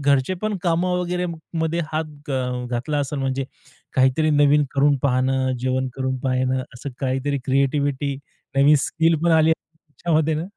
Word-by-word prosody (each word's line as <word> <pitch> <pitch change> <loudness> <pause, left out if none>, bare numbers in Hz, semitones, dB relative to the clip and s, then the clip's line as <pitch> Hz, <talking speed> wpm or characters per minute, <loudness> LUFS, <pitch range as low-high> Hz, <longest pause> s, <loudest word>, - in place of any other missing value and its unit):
घरचे 140 +4 +2
पण 215 -2 -1
कामं 180 +1 +1
वगैरे 180 0 -1 0.3
मध्ये 160 +1 0
हात 150 -2 -5
अ, 125 -1 -2
घातला 125 +5 -2
असेल 145 +1 -2
म्हणजे 135 0 -1 0.5
काहीतरी 130 +4 +3
नवीन 145 0 +4
करून 140 0 +3
पाहणं, 130 0 +1
जेवण 130 +1 -1
करून 130 -1 -2
पाहणं 130 0 0
असं 130 +3 -6
काहीतरी 135 +1 -1
क्रिएटिव्हिटी 140 +1 +1 0.4
नवीन 140 +2 +6
स्किल 165 +4 +1
पण 170 - +4
आली 160 0 +5
असेल 160 0 -4
तुमच्यामध्ये 155 0 0
ना. 160 +3 -2
140 Hz, 155 wpm, -22 LUFS, 130-160 Hz, 0.5 s, नवीन